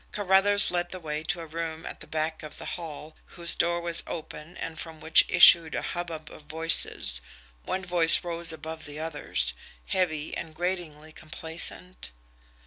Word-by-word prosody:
Carruthers 200 0 +3
led 175 0 -1
the 185 - -7
way 155 -2 -4
to 170 +1 -2
a - - -7
room 160 0 -6
at - - -8
the - - -9
back 155 0 -2
of 155 - -8
the - - -8
hall, 155 -2 -8 0.2
whose 170 -1 +1
door 170 0 0
was 170 -1 -2
open 160 +1 -8
and 165 -1 -6
from 160 -2 -7
which 160 +1 +6
issued 165 -3 +8
a - - -3
hubbub 165 -3 -5
of - - -12
voices 160 - +2 0.4
one 190 0 -3
voice 175 -2 +4
rose 170 -1 +1
above 160 0 -8
the 145 0 -8
others, 145 - -1 0.4
heavy 160 -5 0
and 160 -2 -7
gratingly 165 -3 -4
complacent. 165 +3 -3
165 Hz, 165 wpm, -27 LUFS, 155-175 Hz, 0.4 s, issued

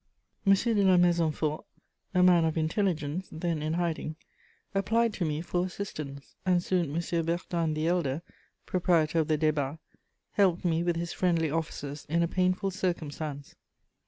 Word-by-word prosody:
M. 195 - +8
de 230 +4 0
La 185 -2 +5
Maisonfort, 165 -3 +2 0.5
a 180 - +5
man 175 -2 +6
of 160 0 0
intelligence, 165 0 0
then 165 -1 -2
in 155 +1 -1
hiding, 165 -2 -2 0.6
applied 225 +3 +2
to 180 - -2
me 155 0 -1
for 175 +1 -1
assistance, 155 -7 -6
and 180 -2 +2
soon 175 -6 0
M. 170 0 0
Bertin 165 -1 -1
the 155 +1 -1
Elder, 165 -3 0 0.4
proprietor 170 -3 +2
of 155 - +1
the 155 - +2
Débats, 150 -1 0 0.5
helped 185 -3 +2
me 165 -1 +2
with 175 0 +1
his 170 0 -3
friendly 165 -4 +1
offices 145 -2 -4
in 170 +2 +2
a - - +2
painful 185 +2 +1
circumstance. 155 -6 -3
170 Hz, 155 wpm, -29 LUFS, 155-180 Hz, 0.6 s, M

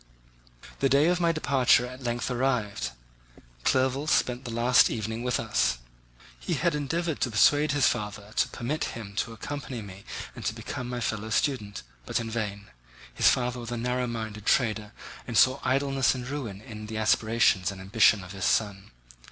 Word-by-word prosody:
The 135 - +2
day 140 +5 +4
of 180 0 +1
my 170 -1 +3
departure 135 -6 +3
at 130 +1 -9
length 120 0 -2
arrived. 120 - -1 0.7
Clerval 130 +3 +1
spent 125 -3 +1
the - - -5
last 120 +2 +4
evening 110 0 -3
with 125 0 0
us. 60 - +1 0.6
He - - -2
had 170 -2 +1
endeavoured 160 +2 -2
to 125 - +1
persuade 145 +7 +4
his 145 -2 +3
father 105 -3 -2
to - - +3
permit 145 +7 -3
him 100 -3 -8
to 115 - -1
accompany 130 +2 -6
me 100 -1 -11 0.3
and - - -8
to - - -1
become 125 -1 -6
my 125 -1 -4
fellow 110 -1 -2
student, 110 -3 -1 0.2
but - - 0
in 115 -1 -5
vain. 105 -3 -4 0.4
His - - +5
father 125 0 0
was 120 -1 -7
a 120 - -3
narrow 125 +1 -1
minded 110 -3 -5
trader 110 -4 +1 0.4
and 115 -3 -2
saw 130 +4 +5
idleness 135 0 +2
and 125 -1 -6
ruin 125 -8 -5
in 105 -3 -9
the 110 0 -5
aspirations 110 -3 +2
and 95 - -9
ambition 100 +1 +3
of 90 - -10
his 95 -1 -4
son. 100 -3 0
120 Hz, 175 wpm, -27 LUFS, 105-130 Hz, 0.7 s, His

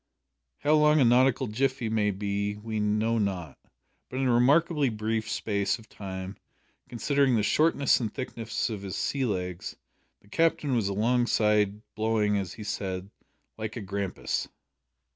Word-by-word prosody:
How 150 +1 +3
long 150 0 +5
a 130 - +5
nautical 125 +2 +4
jiffy 130 +2 -1
may 110 -2 +1
be 100 +1 -2
we 110 0 -4
know 110 +2 +1
not, 90 -8 -3 0.5
but, 130 - -6
in 135 0 +1
a 125 - +3
remarkably 145 +4 +3
brief 110 0 -2
space 100 -3 0
of 115 -1 -16
time, 95 -1 -7 0.5
considering 135 +2 +2
the 105 - +2
shortness 150 +3 +3
and 110 -4 -2
thickness 115 -2 -3
of 105 -3 -5
his 95 -2 -5
sea 135 -2 -1
legs, 90 -5 -3 0.4
the - - -25
Captain 150 +2 +1
was 110 -4 +1
alongside, 105 -1 +2
blowing, 110 -1 +1
as 95 -3 -2
he 110 - -8
said, 95 -1 -4 0.5
"like 110 0 -4
a 115 - -4
grampus." 100 -1 -3
110 Hz, 150 wpm, -28 LUFS, 100-125 Hz, 0.5 s, long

